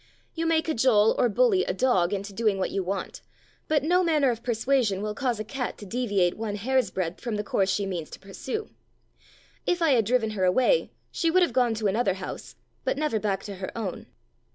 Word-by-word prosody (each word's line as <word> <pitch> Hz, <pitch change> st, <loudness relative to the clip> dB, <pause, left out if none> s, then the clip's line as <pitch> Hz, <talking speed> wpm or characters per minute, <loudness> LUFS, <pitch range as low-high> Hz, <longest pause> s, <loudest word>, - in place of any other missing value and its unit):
You 330 Hz, 0 st, -2 dB
may 320 Hz, -1 st, +3 dB
cajole 225 Hz, -8 st, +3 dB
or 245 Hz, -, +4 dB
bully 430 Hz, -, +3 dB
a -, -, -2 dB
dog 190 Hz, -9 st, +2 dB
into 200 Hz, 0 st, -4 dB
doing 215 Hz, -1 st, +1 dB
what 190 Hz, -, -1 dB
you 195 Hz, -, -1 dB
want, 190 Hz, +1 st, -4 dB, 0.5 s
but 300 Hz, -3 st, +2 dB
no 360 Hz, +4 st, +3 dB
manner 300 Hz, -6 st, +3 dB
of 230 Hz, -1 st, -5 dB
persuasion 230 Hz, -3 st, +1 dB
will 210 Hz, 0 st, -2 dB
cause 245 Hz, -2 st, -1 dB
a -, -, -2 dB
cat 250 Hz, +3 st, -4 dB
to 205 Hz, -, -10 dB
deviate 200 Hz, -5 st, 0 dB
one 215 Hz, -2 st, -3 dB
hair's 255 Hz, +5 st, +1 dB
breadth 180 Hz, -2 st, -3 dB
from 235 Hz, -3 st, -3 dB
the 210 Hz, -, -2 dB
course 195 Hz, -2 st, 0 dB
she 200 Hz, +1 st, 0 dB
means 175 Hz, -5 st, -4 dB
to -, -, -10 dB
pursue. 260 Hz, -, -6 dB, 1.0 s
If 355 Hz, -, +2 dB
I 330 Hz, -3 st, +3 dB
had 235 Hz, -5 st, +3 dB
driven 225 Hz, -1 st, +1 dB
her 200 Hz, -3 st, -2 dB
away 255 Hz, -, +3 dB, 0.2 s
she 335 Hz, -, 0 dB
would 365 Hz, +2 st, +4 dB
have 345 Hz, -, 0 dB
gone 245 Hz, -3 st, +2 dB
to 215 Hz, 0 st, -4 dB
another 200 Hz, -1 st, +1 dB
house, 190 Hz, -1 st, -7 dB, 0.3 s
but -, -, -1 dB
never 300 Hz, -7 st, 0 dB
back 195 Hz, -2 st, -1 dB
to 200 Hz, -2 st, -7 dB
her 190 Hz, 0 st, -5 dB
own. 205 Hz, -6 st, -5 dB
225 Hz, 215 wpm, -26 LUFS, 195-270 Hz, 1.0 s, or